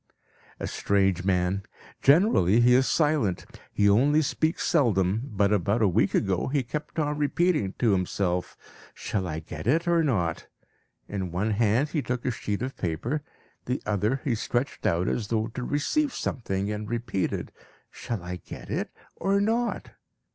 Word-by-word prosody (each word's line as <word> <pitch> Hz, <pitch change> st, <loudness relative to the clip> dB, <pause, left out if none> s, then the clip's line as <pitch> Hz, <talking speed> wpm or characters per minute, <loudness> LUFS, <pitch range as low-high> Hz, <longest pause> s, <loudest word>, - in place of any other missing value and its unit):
"...¬Ýa -, -, -3 dB
strange 95 Hz, -3 st, +1 dB
man. 95 Hz, 0 st, +1 dB, 0.4 s
Generally 135 Hz, -, +5 dB
he 125 Hz, +1 st, +6 dB
is 130 Hz, +1 st, +4 dB
silent; 145 Hz, -, +1 dB, 0.3 s
he 105 Hz, -, +2 dB
only 140 Hz, +10 st, +4 dB
speaks 155 Hz, +3 st, 0 dB
seldom, 110 Hz, -, +2 dB
but 100 Hz, 0 st, +2 dB
about 105 Hz, +3 st, +1 dB
a -, -, +5 dB
week 95 Hz, +1 st, +2 dB
ago 95 Hz, -3 st, +1 dB
he 140 Hz, 0 st, 0 dB
kept 150 Hz, +7 st, -6 dB
on 150 Hz, -1 st, 0 dB
repeating 150 Hz, -, +1 dB
to 115 Hz, -4 st, +3 dB
himself, 90 Hz, -1 st, -1 dB, 0.4 s
'Shall 95 Hz, -3 st, -3 dB
I 80 Hz, -1 st, -4 dB
get 80 Hz, +2 st, -7 dB
it 165 Hz, +7 st, +2 dB
or 170 Hz, -1 st, +3 dB
not?' 90 Hz, -, -1 dB, 0.6 s
In 95 Hz, -4 st, -4 dB
one 100 Hz, +5 st, 0 dB
hand 115 Hz, +6 st, +2 dB
he 150 Hz, -, -1 dB
took 125 Hz, -2 st, -3 dB
a 130 Hz, -, +1 dB
sheet 105 Hz, -2 st, -3 dB
of 130 Hz, +1 st, -4 dB
paper; 100 Hz, -, -2 dB, 0.4 s
the 125 Hz, +2 st, -1 dB
other 105 Hz, +5 st, 0 dB
he 130 Hz, -, 0 dB
stretched 120 Hz, +4 st, -2 dB
out 85 Hz, +2 st, +1 dB
as 110 Hz, -, -1 dB
though 110 Hz, 0 st, 0 dB
to -, -, -4 dB
receive 260 Hz, -, 0 dB
something, 100 Hz, -4 st, -2 dB
and 105 Hz, 0 st, -4 dB
repeated, 115 Hz, -5 st, -2 dB, 0.4 s
'Shall 115 Hz, -7 st, -5 dB
I 90 Hz, +1 st, -5 dB
get -, -, -10 dB
it -, -, -2 dB, 0.3 s
or 195 Hz, +1 st, +1 dB
not?' 230 Hz, +3 st, -1 dB
110 Hz, 160 wpm, -26 LUFS, 95-145 Hz, 0.6 s, he